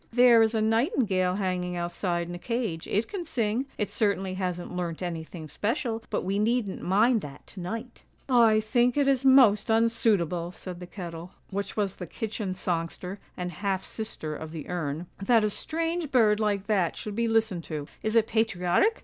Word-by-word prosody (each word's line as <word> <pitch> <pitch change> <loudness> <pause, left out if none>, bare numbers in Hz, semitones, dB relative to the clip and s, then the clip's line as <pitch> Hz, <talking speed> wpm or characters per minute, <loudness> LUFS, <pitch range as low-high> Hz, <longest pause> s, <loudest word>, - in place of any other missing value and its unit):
' - - -36
There 240 -2 +8
is 225 +1 +3
a 220 - +2
nightingale 220 -5 +2
hanging 180 -2 -1
outside 175 0 -2
in 175 - -6
a 175 - -6
cage, 225 -8 -2
it 210 +3 0
can 390 -4 -4
sing; 245 -4 -1
it 210 - 0
certainly 195 -3 0
hasn't 180 -1 -3
learnt 175 -1 -3
anything 165 -1 -5
special, 225 - -2
but - - -1
we 195 +2 0
needn't 220 -2 0
mind 220 +5 +3
that 140 -4 -10
to 195 - -12
night.' 225 +7 -6 0.2
' - - -37
I 230 -4 +5
think 240 +4 +2
it 285 -1 +3
is 270 -1 +2
most 250 -6 +6
unsuitable,' 210 -7 +2
said 180 -1 -8
the 180 - -8
kettle, 175 -2 -8 0.2
which 200 +2 -3
was 200 -3 -1
the 180 - -6
kitchen 210 -1 -4
songster, 180 +2 -3 0.2
and 180 0 -3
half 190 +2 -2
sister 185 -9 -5
of 160 +1 -7
the 160 -2 -7
urn, 165 -2 -3
' - - -34
that 230 -3 +6
a 210 - +1
strange 330 +4 -2
bird 220 -6 +4
like 205 -2 0
that 195 -6 +1
should 210 - -5
be 230 +1 +1
listened 220 -6 +1
to! 150 -3 -5
Is 220 +1 -1
it 225 -1 +5
patriotic? 220 - +2
205 Hz, 190 wpm, -27 LUFS, 180-230 Hz, 0.2 s, There